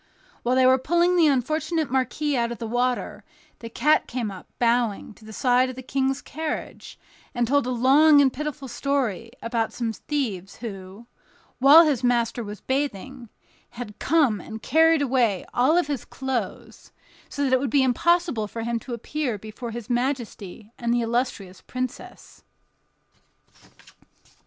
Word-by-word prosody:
While 245 +1 +1
they 260 0 +4
were 260 +1 +5
pulling 345 +6 +2
the 335 -3 +5
unfortunate 305 +3 0
marquis 265 +3 0
out 235 -1 0
of 235 - -5
the 235 - -5
water, 245 +2 -1 0.4
the 230 - -8
cat 300 +6 +2
came 235 -4 -3
up, 190 - -11
bowing, 235 -3 0
to 215 - -18
the 220 - -10
side 250 +3 +2
of 255 - -7
the 260 - -8
King's 270 +1 -1
carriage, 315 +1 -6 0.4
and 240 -1 +1
told 285 0 +2
a - - -1
long 280 +5 +5
and 270 -3 +4
pitiful 295 -1 -5
story 245 -5 -2
about 230 -1 -1
some 230 -2 -3
thieves 210 -6 -4
who, 200 -1 -9 0.5
while 290 +6 +8
his 280 -5 0
master 240 -1 +1
was 210 0 -8
bathing, 265 -2 -3 0.5
had 215 -4 -8
come 275 - +2
and 220 0 -9
carried 320 +1 +4
away 240 -8 +1
all 260 +6 +3
his 285 -6 -4
clothes, 260 -6 -5 0.4
so 285 - -3
that 265 -2 +1
it 260 - +5
would 275 0 -2
be 275 +3 +3
impossible 275 - +1
for 225 +2 -6
him 235 0 -1
to 240 +1 -6
appear 250 0 -3
before 220 +4 -8
his 230 -1 -7
majesty 240 -5 -3
and 235 -1 -1
the 240 0 +2
illustrious 230 -6 -2
princess. 255 -1 -7
250 Hz, 155 wpm, -24 LUFS, 230-280 Hz, 0.5 s, while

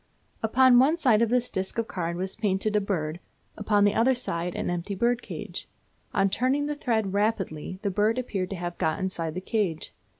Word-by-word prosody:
Upon 245 +2 +5
one 290 +6 +4
side 245 -9 +4
of 230 - +3
this 245 0 +1
disc 190 +3 -3
of 230 -1 0
card 170 -1 -3
was 190 +1 -4
painted 210 0 0
a 210 - +3
bird, 170 -5 -2 0.4
upon 205 -1 +2
the 205 0 +4
other 255 +3 +3
side 175 -7 -3
an - - -2
empty 175 +3 -3
bird 235 +4 +1
cage. - - -7 0.4
On 195 - +2
turning 260 +8 +1
the 295 - -1
thread 220 -8 -1
rapidly 195 -5 -1
the 200 - 0
bird 215 +4 +2
appeared 195 -7 -2
to 195 - -4
have 175 -1 -5
got 160 -1 +1
inside 170 -4 -2
the 185 - -3
cage. 190 -7 -2
205 Hz, 200 wpm, -26 LUFS, 185-235 Hz, 0.4 s, Upon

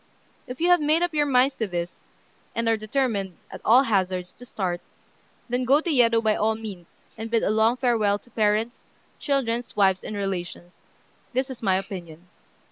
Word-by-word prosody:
If 250 +1 -7
you 345 +2 +2
have 355 -2 +5
made 310 +3 +2
up 350 -2 -1
your 295 -1 +2
minds 265 0 +3
to 220 - -1
this, 175 -1 -4 0.6
and 230 0 -1
are 225 - +4
determined, 215 -5 -2
at - - -9
all 250 +4 +6
hazards, 185 -6 -1
to 245 - -13
start, 180 -6 -3 0.7
then 245 +1 -1
go 270 +4 +4
to 335 +1 -2
Yedo 230 -4 +4
by 215 -1 +3
all 220 +1 +1
means, 200 -6 -8 0.3
and 225 +1 -5
bid 230 -1 +1
a - - +2
long 220 +3 +3
farewell 225 -6 +2
to 240 - -21
parents, 215 +2 0 0.3
children, 245 -5 0
wives, 190 -2 +3
and 215 - -6
relations. 180 -3 -5 0.6
This 260 +2 -1
is 255 - -9
my 195 -4 +2
opinion." 180 -3 -8
225 Hz, 185 wpm, -25 LUFS, 195-250 Hz, 0.7 s, all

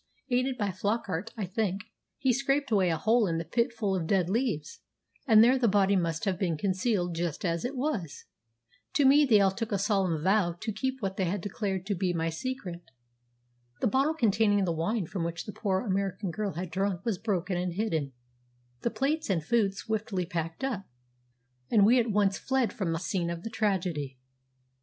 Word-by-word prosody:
"Aided 255 +1 +1
by 205 -2 0
Flockart, 200 0 -2
I 210 - -2
think, 195 +1 -2 0.3
he 265 -3 +2
scraped 275 +1 0
away 190 -4 +3
a 165 - +1
hole 220 +4 +3
in 165 -1 -1
a - - -2
pit 235 - +1
full 210 -4 -1
of 170 -4 -2
dead 185 -2 +2
leaves, 215 - -1 0.5
and 220 -2 +8
there 255 +3 +4
the 240 - +3
body 200 -1 +3
must 165 -3 0
have 190 -3 0
been 170 -5 0
concealed 185 0 0
just 170 +1 -3
as 170 -1 0
it 255 +3 -3
was. 250 - -3 0.7
To 285 - +3
me 290 +2 +7
they 215 -4 +6
all 195 -1 +4
took 225 +3 -4
a 200 - +1
solemn 190 -6 0
vow 190 -2 +3
to 220 +2 -3
keep 260 +4 -3
what 195 -1 -2
they 190 +1 0
declared 195 -1 -3
to 205 - -1
be 185 -1 0
my 165 -1 0
secret. 180 -2 -5 1.0
The - - 0
bottle 275 +7 +2
containing 205 -5 +3
the 175 - 0
wine 175 +5 -1
from 175 +1 -4
which 165 0 -4
the 210 - -7
poor 190 -3 0
American 195 -3 -2
girl 205 +2 -3
had 175 +2 -5
drunk 190 -1 -1
was 215 -6 -1
broken 190 -4 -1
and 175 0 -2
hidden, 165 -9 -1 0.7
the - - 0
plates 295 +5 -1
and 170 -5 +1
food 205 -1 +2
swiftly 210 -3 -2
packed 165 +5 -4
up, 230 -8 -2 0.8
and 205 -3 +5
we 245 +4 +6
at 235 -1 +1
once 200 -2 +2
fled 260 -3 0
from 185 -5 -2
the 165 - 0
scene 175 0 -2
of 170 0 -5
the 225 - -5
tragedy. 180 -11 -1
195 Hz, 195 wpm, -29 LUFS, 175-225 Hz, 1.0 s, and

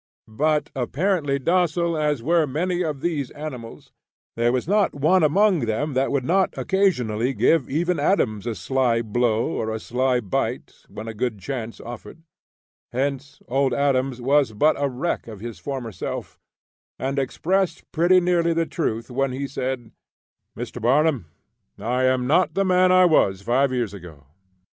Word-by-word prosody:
But 150 +7 0
apparently 145 +3 0
docile 170 +2 +1
as 150 -5 0
were 165 +2 +2
many 175 +6 -1
of 150 -5 -3
these 150 -6 -1
animals, 130 -7 -8 0.4
there 120 +1 +2
was 125 +3 -1
not 205 -2 +2
one 160 +6 +3
among 185 +4 +3
them 140 +7 -1
that 130 +1 +1
would 140 -2 0
not 190 +4 +3
occasionally 130 - +1
give 160 -5 +2
even 170 +5 0
Adams 110 - +1
a 115 - -2
sly 120 +3 0
blow 115 0 +1
or 110 - -2
a 110 0 -3
sly 125 +2 0
bite 100 -6 -3 0.2
when 110 +2 -8
a 115 - -5
good 110 0 -2
chance 115 +1 -5
offered; 120 +6 -10 0.7
hence 140 +2 -3
Old 135 0 +1
Adams 135 -2 +1
was 135 -1 +2
but 150 +9 +3
a 140 - +1
wreck 130 +4 -3
of 110 -3 -9
his 115 +1 -7
former 130 -5 -5
self, - - -6 0.6
and 135 +1 -2
expressed 175 +6 -1
pretty 175 +3 +4
nearly 175 -1 +2
the 165 0 +1
truth 115 -8 -3
when 135 +1 0
he 135 +2 -3
said: 130 -4 -4 0.7
"Mr. 120 +1 -6
Barnum, 135 - +2 0.5
I 125 +3 0
am 130 -1 +2
not 165 +8 +2
the 195 - +2
man 185 0 +4
I 185 0 +6
was 100 - +3
five 130 +5 +2
years 120 -5 -1
ago. 85 -7 -11
135 Hz, 160 wpm, -23 LUFS, 120-165 Hz, 0.7 s, I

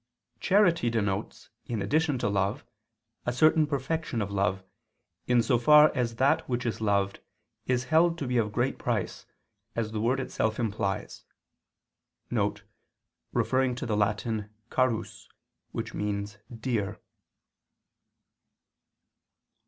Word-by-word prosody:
Charity 180 - +3
denotes, 105 -4 -2 0.2
in 115 -3 -2
addition 145 - +1
to 120 - -1
love, 100 0 -1 0.6
a - - +2
certain 155 +4 +4
perfection 145 -2 -2
of 100 -2 -2
love, 95 -1 0 0.6
in 120 -1 +4
so 120 -2 +2
far 150 +4 +7
as 120 -4 -1
that 130 +3 +2
which 125 -1 -1
is 115 -1 -2
loved 100 -2 +1 0.5
is 125 -1 +1
held 165 +3 +3
to 145 - -3
be 125 -1 0
of 105 -2 0
great 120 +4 -1
price, 115 -5 -2 0.5
as 110 -2 -2
the 110 -1 -2
word 125 +4 +1
itself 110 -3 -1
implies 105 -4 -2 2.1
[*Referring 130 -1 +1
to 130 - -5
the 110 -3 0
Latin 105 +1 -1 0.2
"carus" 130 -4 -1 1.3
(dear)]. 110 -5 -2
120 Hz, 115 wpm, -28 LUFS, 105-135 Hz, 2.1 s, far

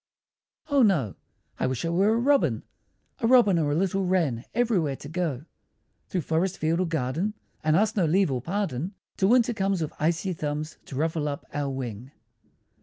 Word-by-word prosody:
O 285 -2 +4
no! 170 - +3 0.5
I - - +1
wish 130 +3 -2
I - - 0
were 195 +6 +3
a - - +2
Robin, 275 +4 +2 0.6
A 230 - +1
Robin 230 -8 +5
or 150 -2 +1
a - - +1
little 195 +3 +1
Wren, 165 -11 0
everywhere 200 - +1
to 140 - -10
go; 155 -4 -2 0.6
Through 180 - -1
forest, 170 +5 0
field, 160 +2 0
or 185 - +1
garden, 160 +7 -1 0.3
And 155 0 +3
ask 215 +4 +2
no 190 -5 +2
leave 185 0 +3
or 125 -2 -1
pardon, 180 - -2 0.2
Till 190 - +3
Winter 240 0 +4
comes 195 -3 0
with 155 -2 -3
icy 165 +4 0
thumbs 150 -1 -4
To 140 - -9
ruffle 155 +1 0
up 140 -1 -4
our 145 -1 -1
wing! 125 -3 -5
170 Hz, 180 wpm, -26 LUFS, 145-195 Hz, 0.6 s, Robin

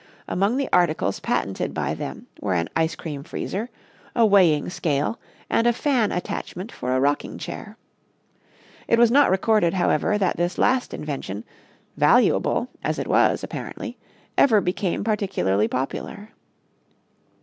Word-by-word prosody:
Among 200 +7 +1
the 275 -1 0
articles 175 -3 +2
patented - - -2
by - - -1
them - - -6
were 95 -3 -1
an 85 -1 -1
ice 160 0 +1
cream 145 -4 -6
freezer, 200 - -4 0.5
a 235 - +5
weighing 180 -8 +4
scale 150 +5 -1 0.3
and 230 - +2
a 240 - +4
fan 245 -4 +1
attachment 180 +3 -4
for 125 +1 -2
a - - +2
rocking 145 +2 0
chair. - - -8 1.1
It 230 - +3
was 235 -1 +5
not 285 +3 +5
recorded, 190 -2 +2
however, 180 +2 +2
that 190 -4 0
this 175 +1 -1
last 255 0 +2
invention, 135 -9 -5 0.5
valuable - - +3 0.2
as - - -1
it - - -2
was - - +3
apparently, - - -6 0.4
ever 225 -6 +6
became 180 0 -1
particularly 190 - +1
popular. 135 - -4
185 Hz, 140 wpm, -23 LUFS, 150-220 Hz, 1.1 s, ever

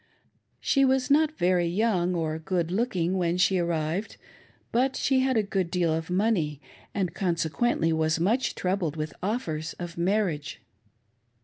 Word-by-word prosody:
She 275 - +2
was 265 0 +2
not 310 +1 +3
very 175 -1 +2
young 180 -1 +1
or 160 -1 -2
good 170 0 -1
looking 190 -4 0
when 175 0 +1
she. 180 +1 +3
arrived, 170 +3 -2 0.5
but 260 +3 +1
she 265 -1 +2
had 260 -2 +2
a 220 - +3
good 195 -3 -1
deal 170 -2 +1
of 160 +1 -3
money, 180 -7 +1 0.3
and 185 -5 -2
consequently 175 0 0
was 160 0 +1
much 225 +10 +1
troubled 180 -4 -1
with 155 -2 -4
offers 170 -7 -2
of 175 -1 -7
marriage. 175 -5 0
180 Hz, 145 wpm, -27 LUFS, 165-215 Hz, 0.5 s, not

